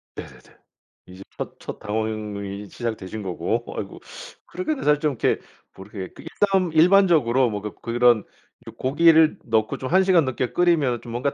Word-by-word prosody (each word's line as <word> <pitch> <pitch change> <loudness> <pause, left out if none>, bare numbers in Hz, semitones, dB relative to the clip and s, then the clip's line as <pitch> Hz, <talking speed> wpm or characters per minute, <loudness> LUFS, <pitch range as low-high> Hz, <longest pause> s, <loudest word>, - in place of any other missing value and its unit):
네네네. - - -12 0.5
이제 95 +1 -12
첫 - - -6
첫 - - -8
당황이 105 -2 -4
시작되신 110 -3 -5
거고 95 +5 -2
아이고 - - -6 0.5
그렇게는 315 -6 -3
사실 150 0 +3
좀 150 -1 0
이렇게 125 - 0 0.3
뭐 95 - -11
이렇게 100 -3 -7
그 - - -13
일단 190 -4 0
일반적으로 160 -8 +4
뭐 105 -1 -4
그 105 -1 -6
그런 120 -1 +3 0.4
요 - - -7
고기를 160 +3 +4
넣고 110 -2 0
좀 130 - -5
1 190 +2 +5
시간 180 -5 +4
넘게 130 -1 -2
끓이면 155 -9 +2
좀 115 - -10
뭔가 125 +4 -1
120 Hz, 330 characters per minute, -23 LUFS, 105-160 Hz, 0.5 s, 1